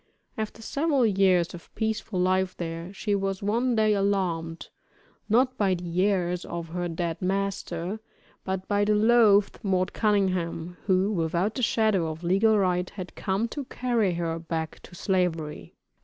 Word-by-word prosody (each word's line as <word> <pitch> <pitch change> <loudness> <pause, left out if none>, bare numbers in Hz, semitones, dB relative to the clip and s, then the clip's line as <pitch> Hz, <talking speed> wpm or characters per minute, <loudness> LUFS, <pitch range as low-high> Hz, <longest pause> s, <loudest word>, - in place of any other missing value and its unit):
After 220 +1 -5
several 285 -1 +1
years 190 -4 +3
of 175 - -11
peaceful 220 -3 -2
life 185 0 +1
there, 165 +1 -5
she 205 +1 -2
was 195 -1 -1
one 235 +4 +1
day 215 -1 +3
alarmed, 185 -5 -1 0.6
not 255 +4 +3
by 195 -3 +3
the 175 +1 -1
heirs 180 -3 0
of 170 -1 -6
her 175 +1 -2
dead 165 -1 -3
master, 195 0 -2 0.4
but 190 0 -3
by 205 0 +2
the 210 +1 +3
loathed 215 -2 +4
"Mort 185 -3 0
Cunningham," 185 -5 0
who, 190 +1 +3
without 175 +2 0
the 255 - -3
shadow 215 -7 +2
of 160 +2 -7
legal 200 +5 +3
right, 180 -2 +1
had 185 -3 -8
come 200 +3 -1
to 285 +1 -5
carry 235 -8 0
her 165 -1 -2
back 160 -1 -4
to 180 - -14
Slavery. 175 -5 -1
190 Hz, 155 wpm, -26 LUFS, 175-210 Hz, 0.6 s, loathed